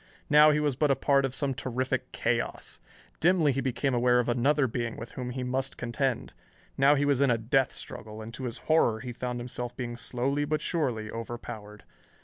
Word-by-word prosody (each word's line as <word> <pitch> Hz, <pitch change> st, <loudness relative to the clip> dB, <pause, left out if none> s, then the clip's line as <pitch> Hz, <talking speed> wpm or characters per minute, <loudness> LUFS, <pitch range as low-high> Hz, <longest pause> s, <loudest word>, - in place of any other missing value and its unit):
Now 150 Hz, +1 st, +8 dB
he 150 Hz, 0 st, +3 dB
was 145 Hz, -3 st, +1 dB
but 150 Hz, +2 st, +2 dB
a 135 Hz, -, +4 dB
part 140 Hz, +1 st, +3 dB
of 135 Hz, -1 st, -3 dB
some 140 Hz, -1 st, 0 dB
terrific 130 Hz, +1 st, -2 dB
chaos. -, -, -2 dB, 0.4 s
Dimly 170 Hz, -3 st, +4 dB
he 135 Hz, +1 st, -1 dB
became 130 Hz, +1 st, -1 dB
aware 125 Hz, 0 st, +3 dB
of 125 Hz, -, 0 dB
another 135 Hz, +4 st, +2 dB
being 120 Hz, -1 st, -3 dB
with 115 Hz, -, -8 dB
whom 125 Hz, -1 st, -5 dB
he 125 Hz, +1 st, -4 dB
must 130 Hz, +1 st, -2 dB
contend. 125 Hz, +1 st, -2 dB, 0.4 s
Now 140 Hz, +2 st, +5 dB
he 145 Hz, 0 st, +1 dB
was 140 Hz, -2 st, +2 dB
in 140 Hz, -, +4 dB
a 120 Hz, -, +3 dB
death 125 Hz, +4 st, +1 dB
struggle, 110 Hz, -1 st, -8 dB
and 110 Hz, +1 st, -8 dB
to 130 Hz, +1 st, -5 dB
his 120 Hz, -, -3 dB
horror 120 Hz, -9 st, +3 dB
he 125 Hz, -1 st, -6 dB
found 125 Hz, 0 st, -4 dB
himself 120 Hz, 0 st, -5 dB
being 120 Hz, -2 st, -4 dB
slowly 130 Hz, +4 st, -1 dB
but 150 Hz, +1 st, 0 dB
surely 125 Hz, -11 st, -1 dB
overpowered. 110 Hz, -2 st, -7 dB
125 Hz, 200 wpm, -28 LUFS, 120-140 Hz, 0.4 s, Now